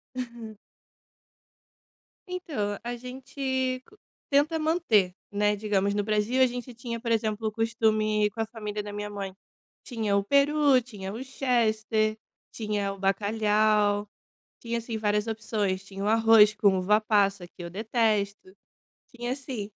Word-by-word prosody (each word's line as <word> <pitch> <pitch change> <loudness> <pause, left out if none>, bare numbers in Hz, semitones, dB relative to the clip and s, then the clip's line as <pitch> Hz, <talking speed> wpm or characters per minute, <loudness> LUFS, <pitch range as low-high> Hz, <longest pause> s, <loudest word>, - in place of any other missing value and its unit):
Uhum. 235 -4 -7 1.7
Então, 290 - -3
a 240 +1 -3
gente 260 +1 -3 0.5
tenta 295 +3 +3
manter, 310 - +2 0.2
né, 205 0 +2
digamos, 200 -1 0
no 205 0 0
Brasil 215 +4 +1
a - - +8
gente 245 0 -5
tinha, 235 0 -5
por 230 0 -3
exemplo, 220 -1 0
o - - -1
costume 215 -1 +1
com 225 - -4
a - - 0
família 210 -2 -5
da 205 0 -7
minha 210 0 -4
mãe. 200 -2 -5 0.5
Tinha 220 -5 -1
o 200 - +2
peru, 280 +3 +4
tinha 205 -6 -8
o 230 +5 -6
chester, 220 -4 0 0.3
tinha 210 -3 -2
o 195 - -12
bacalhau, 210 +1 +2 0.5
tinha 235 0 -2
assim 230 -1 -5
várias 210 0 0
opções, 215 -4 -2
tinha 195 0 -7
o - - 0
arroz 225 -1 +6
com 200 -3 +3
uva-passa 200 -1 +2
que 175 - -13
eu 170 - -6
detesto, 210 -1 0 0.7
tinha, 240 0 -3
assim, 255 -6 -5
215 Hz, 140 wpm, -27 LUFS, 205-240 Hz, 1.7 s, a